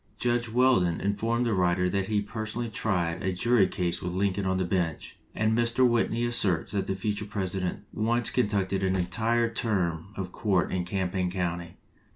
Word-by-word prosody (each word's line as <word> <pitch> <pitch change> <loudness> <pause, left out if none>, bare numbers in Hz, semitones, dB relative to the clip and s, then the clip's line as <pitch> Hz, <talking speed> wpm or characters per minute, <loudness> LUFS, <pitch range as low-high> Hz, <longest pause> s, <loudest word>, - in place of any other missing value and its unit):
Judge 120 +1 0
Weldon 115 -8 +3
informed 115 +4 0
the 115 - +1
writer 90 -1 +2
that 95 +1 -1
he 105 -1 0
personally 110 +2 -4
tried 90 -5 -1
a 95 - 0
jury 100 +2 +3
case 90 -2 -2
with 90 0 -3
Lincoln 95 +1 0
on 95 0 +1
the 95 - 0
bench, 85 -3 -2 0.2
and 110 +1 +1
Mr. 120 +2 +3
Whitney 120 0 +1
asserts 105 -8 +2
that 100 -2 -1
the 95 - -1
future 105 +2 -2
President 95 -2 -3
once 115 +1 0
conducted 100 -5 0
an 95 0 +1
entire 110 +6 +1
term 95 -8 -1
of 95 -2 -4
court 95 -5 0
in 90 -1 -1
Champaign 90 -1 -1
County. 85 -2 -3
100 Hz, 175 wpm, -27 LUFS, 90-115 Hz, 0.2 s, Weldon